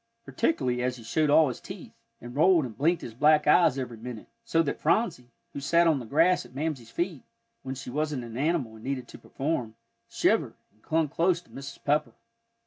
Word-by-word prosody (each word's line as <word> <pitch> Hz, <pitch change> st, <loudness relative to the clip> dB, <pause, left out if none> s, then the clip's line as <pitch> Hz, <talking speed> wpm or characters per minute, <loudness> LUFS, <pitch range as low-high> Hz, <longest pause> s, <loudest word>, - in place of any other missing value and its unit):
Particularly 125 Hz, -, 0 dB
as 125 Hz, 0 st, -1 dB
he 115 Hz, -, -12 dB
showed 155 Hz, +6 st, +1 dB
all 155 Hz, +1 st, +6 dB
his 125 Hz, -, -6 dB
teeth, -, -, -10 dB, 0.3 s
and 120 Hz, +1 st, -10 dB
rolled 165 Hz, 0 st, +4 dB
and 115 Hz, -4 st, -8 dB
blinked 165 Hz, +4 st, +1 dB
his 115 Hz, -, -7 dB
black 150 Hz, +5 st, +4 dB
eyes 150 Hz, -3 st, +5 dB
every 125 Hz, -3 st, -5 dB
minute, 115 Hz, -1 st, -8 dB, 0.2 s
so 165 Hz, -8 st, +2 dB
that 145 Hz, -, -3 dB
Phronsie, 160 Hz, -, 0 dB, 0.2 s
who -, -, -5 dB
sat 170 Hz, +5 st, +3 dB
on 160 Hz, -4 st, +3 dB
the 120 Hz, -, -8 dB
grass 175 Hz, +7 st, +3 dB
at -, -, -17 dB
Mamsie's 140 Hz, -6 st, -3 dB
feet, 170 Hz, -1 st, -3 dB, 0.4 s
when 135 Hz, 0 st, -5 dB
she 125 Hz, -1 st, -7 dB
wasn't 150 Hz, -2 st, -2 dB
an 115 Hz, -1 st, -9 dB
animal 140 Hz, -4 st, 0 dB
and 110 Hz, 0 st, -13 dB
needed 130 Hz, -2 st, -3 dB
to -, -, -11 dB
perform, 130 Hz, -6 st, -3 dB, 0.3 s
shivered, -, -, +1 dB, 0.2 s
and 110 Hz, -, -32 dB
clung 160 Hz, +3 st, +1 dB
close 170 Hz, +4 st, +1 dB
to 180 Hz, -, -25 dB
Mrs. 135 Hz, 0 st, -9 dB
Pepper. 150 Hz, +1 st, +1 dB
140 Hz, 205 wpm, -27 LUFS, 125-165 Hz, 0.4 s, all